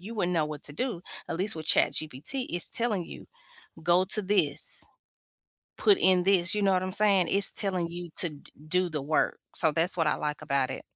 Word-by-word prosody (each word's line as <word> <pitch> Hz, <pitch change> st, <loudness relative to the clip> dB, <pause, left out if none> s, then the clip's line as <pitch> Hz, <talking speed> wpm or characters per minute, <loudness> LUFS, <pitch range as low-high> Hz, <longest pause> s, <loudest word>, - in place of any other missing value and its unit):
you 215 Hz, +6 st, -9 dB
wouldn't 180 Hz, -3 st, -1 dB
know 160 Hz, -, +2 dB
what 150 Hz, -1 st, -8 dB
to 145 Hz, -, -5 dB
do. 220 Hz, -, -3 dB, 0.3 s
At 165 Hz, -, -3 dB
least 195 Hz, +4 st, -2 dB
with 155 Hz, -, -7 dB
ChatGPT, 155 Hz, -, 0 dB
it's 175 Hz, 0 st, -1 dB
telling 220 Hz, -6 st, -1 dB
you, -, -, -12 dB, 0.6 s
"Go 175 Hz, +2 st, +3 dB
to 210 Hz, +3 st, +1 dB
this, 200 Hz, +1 st, +1 dB, 1.0 s
put 405 Hz, -3 st, +4 dB
in 185 Hz, -1 st, +4 dB
this." 185 Hz, -2 st, +3 dB
You 210 Hz, -, -1 dB
know 195 Hz, -, +3 dB
what 185 Hz, -1 st, +1 dB
I'm 185 Hz, 0 st, -4 dB
saying? 195 Hz, -5 st, +2 dB
It's 200 Hz, 0 st, +5 dB
telling 185 Hz, -4 st, 0 dB
you 175 Hz, 0 st, -8 dB
to 175 Hz, -, +2 dB
d 145 Hz, -, -12 dB, 0.2 s
do 180 Hz, +2 st, +1 dB
the 150 Hz, -3 st, -4 dB
work. 155 Hz, +2 st, 0 dB, 0.2 s
So 160 Hz, -3 st, +2 dB
that's 165 Hz, +4 st, +1 dB
what 165 Hz, -2 st, +1 dB
I -, -, +1 dB
like 150 Hz, 0 st, -4 dB
about 140 Hz, -3 st, 0 dB
it. -, -, -6 dB
180 Hz, 215 wpm, -27 LUFS, 160-195 Hz, 1.0 s, It's